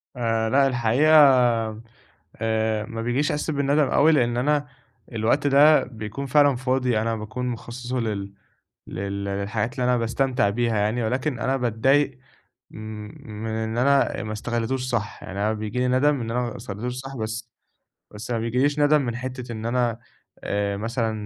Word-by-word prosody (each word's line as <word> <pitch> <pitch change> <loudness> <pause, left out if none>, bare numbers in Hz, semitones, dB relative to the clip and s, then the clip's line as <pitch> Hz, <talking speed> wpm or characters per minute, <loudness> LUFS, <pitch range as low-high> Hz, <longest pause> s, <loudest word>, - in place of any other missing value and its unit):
آآ، 115 -2 0
لأ، 135 +2 +4
الحقيقة 125 +5 +2 1.2
آآ، 110 -1 0
ما 115 +1 -6
بيجيش 125 +5 0
إحساسّ 150 +2 -2
بالندم 145 0 +2
أوي، 160 +3 +4
لإن 120 -4 +2
أنا 145 +2 +1 0.4
الوقت 115 +6 +1
ده 145 +2 +6
بيكون 115 +3 -6
فعلًا 145 -1 +4
فاضي، 125 -2 0
أنا 115 +1 -1
باكون 110 +4 -5
مخصّصُه 125 +1 -4
لل 100 -3 -3 0.5
لل 100 +1 -4
للحاجات 100 +3 -2
اللي 125 - -2
أنا 125 0 +3
باستمتع 120 -1 +1
بيها 115 0 0
يعني، 105 +4 0
ولكن 130 +3 -1
أنا 135 +3 0
باتضايق 130 +3 +1 0.5
م - - -12 0.7
من 110 - -3
إن 110 +1 -3
أنا 140 +2 +2
آآ، - - -4
ما 110 - -4
استغليتوش 120 +3 -2
صح، 110 -4 -3
يعني 95 +1 -7
أنا 105 +2 +1
بييجي 110 +2 -4
لي 125 - +1
ندم 135 +2 +2
إن 115 0 -4
أنا 125 - 0
ما 120 0 -4
استغليتوش 120 +2 -5
صح 135 +1 -8
بس 110 +1 -5 0.6
بس 110 +4 -8
ما 115 - 0
بييجيليش 130 +6 0
ندم 145 0 +4
من 120 -3 -3
حتّة 125 0 -6
إن 110 -1 -6
أنا 120 -1 0 0.4
آآ، 100 0 -1
مثلًا 115 +1 -1
120 Hz, 165 wpm, -24 LUFS, 110-130 Hz, 1.2 s, ده